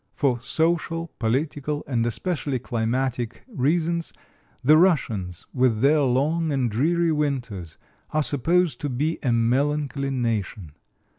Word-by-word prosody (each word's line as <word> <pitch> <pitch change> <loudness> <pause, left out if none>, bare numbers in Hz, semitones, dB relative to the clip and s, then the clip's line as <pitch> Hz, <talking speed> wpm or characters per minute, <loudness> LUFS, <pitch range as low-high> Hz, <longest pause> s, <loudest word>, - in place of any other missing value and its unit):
For 125 -5 +1
social, 165 +3 0
political, 145 +5 -1
and 120 -4 0
especially 145 - -2
climatic 120 0 -2
reasons, 170 - 0 0.5
the 150 +4 +6
Russians, 110 - +1
with 125 -4 +2
their 150 +3 +4
long 150 +5 +1
and 130 -5 0
dreary 165 +8 +2
winters, 125 - -2 0.3
are 155 0 +1
supposed 160 +1 +1
to 145 - -2
be 150 +6 -1
a 130 - +1
melancholy 140 +4 +1
nation. 110 - -2
140 Hz, 120 wpm, -24 LUFS, 120-155 Hz, 0.5 s, the